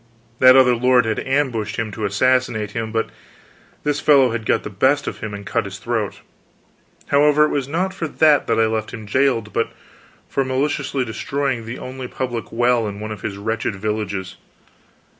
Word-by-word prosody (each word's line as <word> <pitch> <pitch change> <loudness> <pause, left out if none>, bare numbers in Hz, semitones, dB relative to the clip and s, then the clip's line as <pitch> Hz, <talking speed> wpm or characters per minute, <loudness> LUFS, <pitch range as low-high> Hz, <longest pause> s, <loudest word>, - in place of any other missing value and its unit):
That 130 0 +8
other 130 -2 +6
lord 125 0 +3
had 110 -1 -1
ambushed 125 -6 -1
him 110 -2 -3
to 105 +1 -4
assassinate 110 0 +1
him, 110 0 -4
but 115 0 -1 0.7
this 145 -1 0
fellow 140 -4 +5
had 115 -1 -4
got - - +2
the - - -6
best 130 +9 +2
of - - -5
him 110 - -5
and 100 0 -7
cut 115 -1 -1
his 100 0 -7
throat. 110 -1 -3 0.9
However, 150 +1 +5
it - - -1
was 140 -3 -1
not 180 +6 -1
for 170 -4 -3
that 155 -1 +3
that 115 -1 +1
I 110 - +5
left 110 +1 -2
him 110 -2 -9
jailed, 115 -2 +1
but - - 0 0.6
for 135 - 0
maliciously 130 0 -1
destroying 120 +1 -2
the 115 - -5
only 130 0 -7
public 120 -3 -4
well 120 -1 +2
in 100 0 -6
one 110 +1 -5
of 105 - -7
his 100 - -4
wretched 110 0 -2
villages. 100 -2 -3
115 Hz, 185 wpm, -20 LUFS, 110-135 Hz, 0.9 s, That